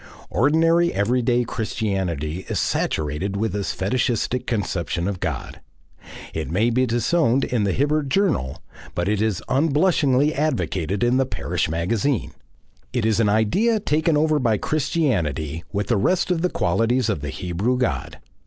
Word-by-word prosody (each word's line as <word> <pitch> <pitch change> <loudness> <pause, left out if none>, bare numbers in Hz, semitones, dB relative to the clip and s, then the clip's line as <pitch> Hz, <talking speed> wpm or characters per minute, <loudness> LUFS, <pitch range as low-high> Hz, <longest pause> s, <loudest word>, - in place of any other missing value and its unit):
Ordinary 165 +5 +3
everyday 120 +3 +1
Christianity 95 - -2
is - - -1
saturated 80 +7 -1
with 110 -1 -1
this 100 -1 -2
fetishistic 120 +4 -1
conception 90 -5 -2
of 100 -3 -3
God. 80 -8 -4 0.7
It 80 -1 -3
may 105 +8 +2
be 130 +2 +2
disowned 125 +2 +2
in 115 -5 0
THE 100 - +1
HIBBERT 145 +4 0
JOURNAL, 115 - 0 0.3
but 85 0 -1
it 105 0 +1
is 110 -4 0
unblushingly 145 -1 +2
advocated 100 - -1
in 120 +1 +3
the 135 -1 +2
parish - - -2
magazine. 100 - -1 0.6
It 120 -3 -1
is 110 -1 +2
an 110 -3 +3
idea 190 - +2
taken 155 -3 +1
over 155 0 +2
by 115 -5 +2
Christianity 90 - -1
with 105 0 -1
the 120 - +3
rest 180 - +1
of 170 -2 +1
the 180 - +1
qualities 115 - +1
of 105 -10 -1
the 75 - -4
Hebrew 90 - -1
God. 125 -1 -2
115 Hz, 150 wpm, -22 LUFS, 95-140 Hz, 0.7 s, Ordinary